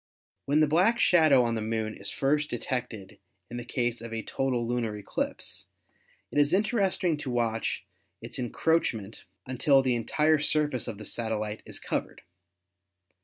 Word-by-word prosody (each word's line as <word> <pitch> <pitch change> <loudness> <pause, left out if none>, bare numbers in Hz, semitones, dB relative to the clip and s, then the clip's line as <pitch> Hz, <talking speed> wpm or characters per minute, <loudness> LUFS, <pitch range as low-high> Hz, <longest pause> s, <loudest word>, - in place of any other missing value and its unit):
When 145 +2 +3
the 155 - +5
black 185 +10 +3
shadow 155 - +5
on 115 -1 0
the 110 - -2
Moon 110 0 -2
is 100 -1 -3
first 150 +2 +1
detected 120 -5 -4 0.3
in 120 - -4
the 120 - -4
case 120 -1 -1
of 115 0 -7
a 115 -1 -3
total 130 -3 -1
lunar 115 -3 -1
eclipse, 100 - -3 0.6
it - - +1
is 145 +4 +4
interesting 195 -5 +1
to 145 -2 -5
watch 115 -2 -1 0.3
its - - -6
encroachment 120 -5 -1 0.2
until 135 +2 +3
the 130 -1 +2
entire 150 +6 +2
surface 150 -3 +1
of 105 - -5
the 105 - -9
satellite 110 -1 -2
is - - -3
covered. - - -4
125 Hz, 155 wpm, -28 LUFS, 115-150 Hz, 0.6 s, the